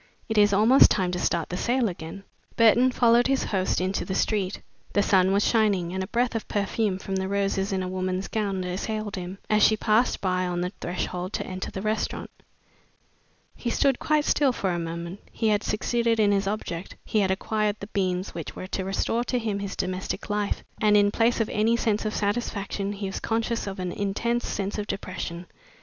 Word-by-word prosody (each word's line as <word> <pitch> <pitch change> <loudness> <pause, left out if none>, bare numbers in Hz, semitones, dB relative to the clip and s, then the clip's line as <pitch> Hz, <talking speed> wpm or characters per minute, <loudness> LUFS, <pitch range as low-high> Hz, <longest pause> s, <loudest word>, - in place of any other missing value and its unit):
It 220 -1 +1
is 205 0 +5
almost 220 +7 +7
time 185 -2 +1
to 180 - -2
start 170 -2 0
the 180 - -3
sale 245 0 +1
again." 175 +1 -7 0.3
Burton 235 +3 +5
followed 240 0 +4
his 270 0 +1
host 190 -2 0
into 185 +2 -1
the 190 - -3
street. 200 -2 0 0.3
The 205 - +3
sun 190 -1 +4
was 200 +1 +3
shining, 200 -6 +2
and 190 - -2
a - - -5
breath 240 +3 0
of 225 - -3
perfume 205 -1 0
from 190 0 -3
the 190 0 -1
roses 195 0 0
in 190 -1 0
a - - -3
woman's 185 +1 -2
gown 200 -4 -1
assailed 205 +3 -3
him, 185 +1 -6
as 215 0 +3
she 220 - +5
passed 220 +4 +2
by 185 -1 0
on 175 0 -2
the 180 +1 -2
threshold 180 +1 -3
to - - -2
enter 185 0 -5
the 190 - -6
restaurant. 215 +1 -2 1.2
He 240 - -3
stood 270 +2 +2
quite 305 -1 +2
still 280 -3 +3
for 195 -6 -1
a 175 - -1
moment. 170 +3 -5
He 220 - 0
had 210 -1 +2
succeeded 230 +1 0
in 205 -1 +4
his 195 -1 +1
object, 190 -4 -4
he 215 - +1
had 195 -2 +2
acquired 210 +2 0
the - - -6
beans 185 -2 -2
which 165 -2 -6
were - - -6
to 190 0 -3
restore 195 +5 0
to 250 - 0
him 215 -4 -2
his 200 -1 -4
domestic 185 +3 -3
life, 205 -1 -1 0.2
and 210 -1 +5
in 205 0 +4
place 230 +3 +2
of 225 - 0
any 225 +3 +2
sense 220 -2 0
of 215 - -2
satisfaction 200 -2 -2
he 200 0 -5
was 195 - -3
conscious 230 0 -1
of 195 - -5
an 180 -1 -3
intense 225 +6 -1
sense 200 +1 -3
of 210 - -3
depression. 185 -3 -5
200 Hz, 205 wpm, -26 LUFS, 185-220 Hz, 1.2 s, almost